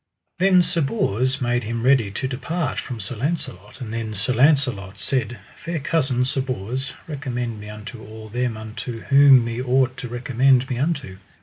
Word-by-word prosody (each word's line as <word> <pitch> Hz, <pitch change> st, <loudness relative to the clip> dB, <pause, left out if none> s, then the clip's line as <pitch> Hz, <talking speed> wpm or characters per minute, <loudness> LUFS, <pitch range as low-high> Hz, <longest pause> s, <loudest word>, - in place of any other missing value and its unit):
Then 185 Hz, -1 st, +5 dB
Sir 170 Hz, -, 0 dB
Bors 130 Hz, -, 0 dB
made 120 Hz, 0 st, +1 dB
him 115 Hz, +1 st, -3 dB
ready 130 Hz, -5 st, +4 dB
to 100 Hz, +6 st, -3 dB
depart 135 Hz, +4 st, -2 dB
from 120 Hz, -3 st, -6 dB
Sir 105 Hz, +5 st, -5 dB
Launcelot; 120 Hz, -, -4 dB
and 115 Hz, -4 st, -6 dB
then 115 Hz, -2 st, -3 dB
Sir 100 Hz, +6 st, 0 dB
Launcelot 125 Hz, -8 st, +2 dB
said: 120 Hz, +1 st, -1 dB, 0.2 s
Fair 170 Hz, 0 st, -4 dB
cousin, 135 Hz, -4 st, +1 dB
Sir 135 Hz, +1 st, 0 dB
Bors, 130 Hz, +1 st, -4 dB
recommend 125 Hz, -7 st, -4 dB
me 105 Hz, 0 st, -9 dB
unto 110 Hz, +2 st, -9 dB
all 110 Hz, 0 st, -10 dB
them 120 Hz, 0 st, -2 dB
unto 110 Hz, +2 st, -6 dB
whom 140 Hz, -3 st, +6 dB
me 115 Hz, +1 st, -3 dB
ought 130 Hz, 0 st, +2 dB
to 125 Hz, -, -5 dB
recommend 125 Hz, +2 st, +2 dB
me 125 Hz, -, -1 dB
unto. 140 Hz, -, -2 dB
125 Hz, 175 wpm, -22 LUFS, 115-135 Hz, 0.2 s, whom